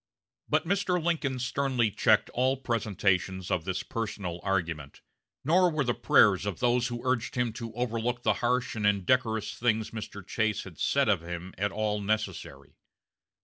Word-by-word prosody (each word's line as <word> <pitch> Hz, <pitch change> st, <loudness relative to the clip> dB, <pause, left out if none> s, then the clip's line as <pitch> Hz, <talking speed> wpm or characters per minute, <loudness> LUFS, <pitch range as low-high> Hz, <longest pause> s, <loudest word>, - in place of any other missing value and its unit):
But -, -, +2 dB
Mr. 185 Hz, -1 st, +1 dB
Lincoln 160 Hz, -6 st, -1 dB
sternly 125 Hz, -2 st, 0 dB
checked -, -, +3 dB
all 130 Hz, +2 st, +1 dB
presentations 95 Hz, -6 st, -1 dB
of 85 Hz, -3 st, 0 dB
this 95 Hz, -1 st, -2 dB
personal 100 Hz, -6 st, -4 dB
argument; 80 Hz, -7 st, -2 dB, 0.4 s
nor 180 Hz, +5 st, +4 dB
were 155 Hz, -3 st, 0 dB
the 120 Hz, -2 st, 0 dB
prayers 100 Hz, -3 st, +4 dB
of 95 Hz, -5 st, -3 dB
those 120 Hz, 0 st, +2 dB
who 120 Hz, 0 st, -6 dB
urged 125 Hz, -3 st, 0 dB
him 125 Hz, -3 st, 0 dB
to 115 Hz, 0 st, -6 dB
overlook 120 Hz, 0 st, -2 dB
the -, -, +3 dB
harsh 125 Hz, +1 st, 0 dB
and 105 Hz, -2 st, +1 dB
indecorous 110 Hz, +2 st, +1 dB
things 110 Hz, -2 st, 0 dB
Mr. 105 Hz, -3 st, -7 dB
Chase 110 Hz, -1 st, -1 dB
had 90 Hz, -5 st, -12 dB
said 140 Hz, -2 st, +2 dB
of 100 Hz, -6 st, +2 dB
him 85 Hz, +2 st, -7 dB
at 100 Hz, +1 st, -1 dB
all 105 Hz, 0 st, -1 dB
necessary. 100 Hz, -9 st, -3 dB
110 Hz, 160 wpm, -28 LUFS, 95-125 Hz, 0.4 s, nor